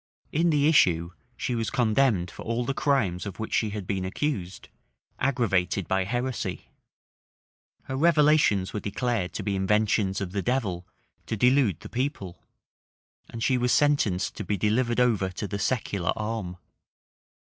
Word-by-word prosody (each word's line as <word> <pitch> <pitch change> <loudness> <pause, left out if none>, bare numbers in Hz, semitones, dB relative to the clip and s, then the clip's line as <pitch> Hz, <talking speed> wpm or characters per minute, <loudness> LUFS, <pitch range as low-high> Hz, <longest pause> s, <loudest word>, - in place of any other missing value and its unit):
In 165 +3 +2
the 145 -2 +3
issue, 85 - +3 0.3
she 125 - -2
was 115 -2 -1
condemned 110 -6 +2
for - - -11
all 115 +2 -2
the 140 - -1
crimes 110 -12 0
of 95 - -7
which 110 - -5
she 110 - +2
had 105 -2 -5
been 95 0 -2
accused, 95 -2 -3 0.5
aggravated 100 - 0
by 95 0 +1
heresy; 125 +3 -3 1.1
her 130 - -5
revelations 150 - +3
were 105 - -2
declared 105 -2 -2
to - - -4
be 100 -2 -1
inventions 100 0 +1
of 95 -3 -4
the 100 +1 -2
devil 95 -8 -2 0.4
to 110 - -2
delude 125 - +3
the - - -8
people; 125 -8 -4 0.9
and 115 -1 -5
she 130 -2 +2
was 125 0 +1
sentenced 140 -12 +2
to - - -4
be 105 - -1
delivered 120 +5 +1
over 110 -6 +2
to 95 +3 -5
the 100 +1 -4
secular 100 -7 -1
arm. 105 -5 -4
110 Hz, 155 wpm, -26 LUFS, 95-130 Hz, 1.1 s, the